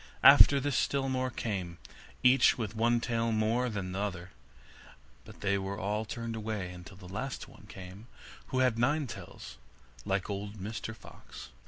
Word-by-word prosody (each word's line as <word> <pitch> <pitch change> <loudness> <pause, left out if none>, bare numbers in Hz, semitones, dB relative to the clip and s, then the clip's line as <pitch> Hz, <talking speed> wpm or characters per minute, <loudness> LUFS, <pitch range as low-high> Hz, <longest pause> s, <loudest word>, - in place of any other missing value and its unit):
After 140 - +9
this 140 -1 -1
still 135 +1 +1
more 130 0 0
came, 95 -8 -4 0.5
each 125 +2 +6
with 110 -3 -4
one 120 +2 +3
tail 115 -1 0
more 115 +3 +1
than 100 -4 -4
the 95 - -3
other, 95 -3 -4 0.9
but - - -14
they 100 0 +1
were 95 +1 -4
all 105 +2 -2
turned 115 +1 -5
away, 105 -4 -4
until 90 +2 -11
at 90 - -10
last 120 +7 -4
one - - -16
came 95 +4 -10 0.4
who 130 - 0
had 125 -3 +2
nine 145 +5 +2
tails, - - -9 0.4
like 95 -1 -1
old 100 +1 -5
Mr 110 +3 -5
Fox. - - -12
110 Hz, 165 wpm, -31 LUFS, 100-120 Hz, 0.9 s, After